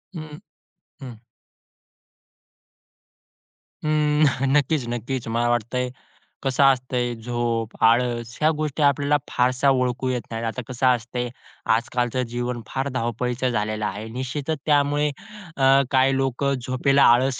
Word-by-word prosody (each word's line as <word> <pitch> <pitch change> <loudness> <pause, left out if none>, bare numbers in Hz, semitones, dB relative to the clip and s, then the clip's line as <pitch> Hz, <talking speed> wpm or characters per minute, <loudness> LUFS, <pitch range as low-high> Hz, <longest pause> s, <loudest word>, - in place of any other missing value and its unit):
हं, 155 -2 -7 0.6
हं. 125 -5 -9 2.7
उम्म, 150 -3 +2
नक्कीच-नक्कीच 130 -4 0
मला 120 +1 0
वाटतंय, 120 +2 -1 0.5
कसं 135 +1 +2
असतंय 125 -2 +2
झोप, 115 -1 -2
आळस 120 0 +2
ह्या 155 - +5
गोष्टी 150 -1 -1
आपल्याला 145 +1 +3
फारशा 130 +2 +2
ओळखू 130 -1 0
येत 125 -1 -1
नाहीत, 115 0 -3
आता 115 +3 -3
कसं 130 0 0
असतंय 125 0 0 0.5
आज 115 +1 -2
कालचं 125 +1 0
जीवन 120 0 -3
फार 135 +1 -2
धावपळीचं 125 +1 -1
झालेलं 110 -2 -1
आहे, 105 +2 -4
निश्चितच 135 +6 -3
त्यामुळे 145 0 +2 0.5
अ, 135 0 +5
काही 135 0 +3
लोकं 135 +1 0
झोपेला 135 +2 +3
आळस 130 +1 +1
125 Hz, 115 wpm, -23 LUFS, 120-140 Hz, 2.7 s, ह्या